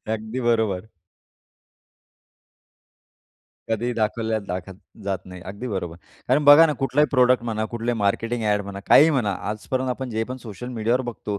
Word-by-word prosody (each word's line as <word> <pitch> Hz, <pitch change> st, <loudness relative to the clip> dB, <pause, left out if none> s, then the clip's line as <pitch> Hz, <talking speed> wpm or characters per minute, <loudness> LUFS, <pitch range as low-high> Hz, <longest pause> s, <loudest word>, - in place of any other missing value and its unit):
अगदी 110 Hz, +4 st, -5 dB
बरोबर. 110 Hz, -4 st, 0 dB, 2.8 s
कधी 115 Hz, +2 st, -1 dB
दाखवल्या 110 Hz, 0 st, -1 dB
दाखत 90 Hz, +1 st, -5 dB, 0.3 s
जात 95 Hz, -2 st, -1 dB
नाही 90 Hz, -1 st, -10 dB
अगदी 110 Hz, +6 st, -7 dB
बरोबर. 90 Hz, -5 st, -4 dB, 0.3 s
कारण 140 Hz, +3 st, +3 dB
बघा 145 Hz, +3 st, +9 dB
ना 150 Hz, -, 0 dB
कुठलाही 145 Hz, +3 st, +3 dB
प्रॉडक्ट 125 Hz, -2 st, +4 dB
म्हणा, 110 Hz, -2 st, -2 dB
कुठलाही 120 Hz, 0 st, -2 dB
मार्केटिंग 115 Hz, +3 st, -1 dB
ॲड 105 Hz, -1 st, +1 dB
म्हणा, 100 Hz, 0 st, -7 dB
काहीही 160 Hz, +2 st, +7 dB
म्हणा. 120 Hz, -9 st, 0 dB, 0.2 s
आजपर्यंत 130 Hz, +5 st, -3 dB
आपण 130 Hz, 0 st, -4 dB
जे 110 Hz, 0 st, -1 dB
पण 130 Hz, -, -5 dB
सोशल 115 Hz, +4 st, -7 dB
मीडियावर 115 Hz, +4 st, +1 dB
बघतो, 105 Hz, -2 st, -5 dB
115 Hz, 150 wpm, -23 LUFS, 105-125 Hz, 2.8 s, बघा